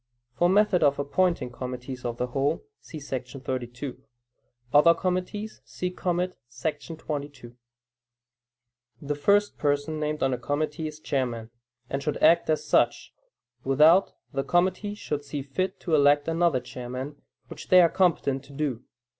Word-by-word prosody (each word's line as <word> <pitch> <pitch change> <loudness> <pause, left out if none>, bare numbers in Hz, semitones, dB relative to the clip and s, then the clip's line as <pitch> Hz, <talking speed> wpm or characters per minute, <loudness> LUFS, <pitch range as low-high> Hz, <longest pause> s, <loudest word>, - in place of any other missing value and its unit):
[For 175 +7 +2
method 200 -1 +4
of 140 -2 +4
appointing 145 -2 0
committees 125 0 -6
of 120 -1 -3
the 125 - 0
whole, 135 - -1
see 160 - -10
§ 130 -2 -6
32; 125 +1 -5 0.7
other 170 +3 +7
committees, 185 +4 -3
see 180 0 -4
commit, 180 0 -1
§ 155 +6 -4
22.] 145 -6 -6 1.4
The 145 0 -3
first 200 +8 +2
person 145 +1 0
named 150 -1 -2
on 135 -1 +2
a 125 - -3
committee 155 +2 -2
is 155 0 -9
chairman, 120 -6 -2 0.4
and 135 +2 -3
should 150 +1 -2
act 170 0 +4
as 155 -1 +1
such, - - +1 0.5
without 155 +8 +5 0.2
the 135 - -1
committee 185 +5 +1
should 150 -8 -4
see 145 -1 -5
fit 185 +7 -3
to 170 - -3
elect 145 0 +4
another 165 -4 +2
chairman, 125 +4 -7 0.3
which - - -10
they 185 - +7
are 175 - +7
competent 160 -7 +1
to 140 - -14
do. 135 -5 -2
145 Hz, 145 wpm, -26 LUFS, 135-170 Hz, 1.4 s, other